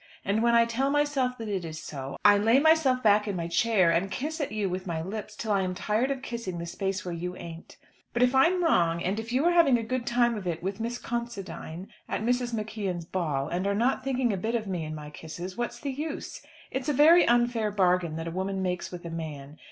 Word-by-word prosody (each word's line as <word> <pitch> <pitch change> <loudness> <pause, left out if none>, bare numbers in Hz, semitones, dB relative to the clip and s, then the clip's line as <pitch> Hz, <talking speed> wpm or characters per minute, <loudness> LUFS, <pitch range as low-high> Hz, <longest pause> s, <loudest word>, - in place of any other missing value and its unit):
And 205 +3 +1
when 235 0 +4
I 235 0 +6
tell 245 +4 0
myself 280 -3 +1
that 225 -2 -6
it 195 -4 -2
is 160 -1 -6
so, 135 -3 -6
I 205 0 +8
lay 225 +5 +4
myself 290 -5 +4
back 210 0 +4
in 200 - -2
my 170 -1 -2
chair 185 0 +3
and 175 +4 +1
kiss 305 - -3
at 280 - -2
you 210 -2 -1
with 185 +1 -4
my 165 -2 -2
lips 210 +5 -6
till 220 0 -3
I 200 -1 +3
am 185 -1 -2
tired 215 +7 0
of 270 -1 -3
kissing 230 -7 -4
the 170 - -4
space 195 +3 -3
where 175 - -3
you 180 +2 -4
ain't. 165 -1 -10 0.3
But 240 +1 +2
if 250 +1 +3
I 265 +4 +6
am 360 0 0
wrong, 170 - +2
and 195 +4 -1
if 225 +1 -6
you 260 +5 +2
are 350 - +5
having 330 -8 +5
a 230 - -3
good 245 +1 -3
time 240 -1 +2
of 200 -4 -5
it 170 -1 -3
with 195 +2 -3
Miss 235 +2 -2
Considine 200 -7 -5 0.2
at - - -2
Mrs. 245 +1 0
McKeon's 210 -6 -3
ball, 155 -7 -1
and 180 +3 -1
are 200 - +1
not 245 +6 +1
thinking 255 -4 0
a - - -1
bit 225 +6 -2
of 225 -2 -1
me 180 -5 -3
and 155 0 -5
my 150 -1 -8
kisses, 170 +4 -7
what's 240 +1 -3
the 280 +1 -3
use? 295 +3 -5 0.3
It's 265 +2 -2
a - - +2
very 320 +6 +6
unfair 240 -2 +2
bargain 180 -5 +1
that 165 +1 -4
a - - -3
woman 190 +2 -2
makes 180 -1 -2
with 175 -1 -9
a 170 - -5
man. 150 -3 -7
210 Hz, 250 wpm, -28 LUFS, 180-245 Hz, 0.3 s, I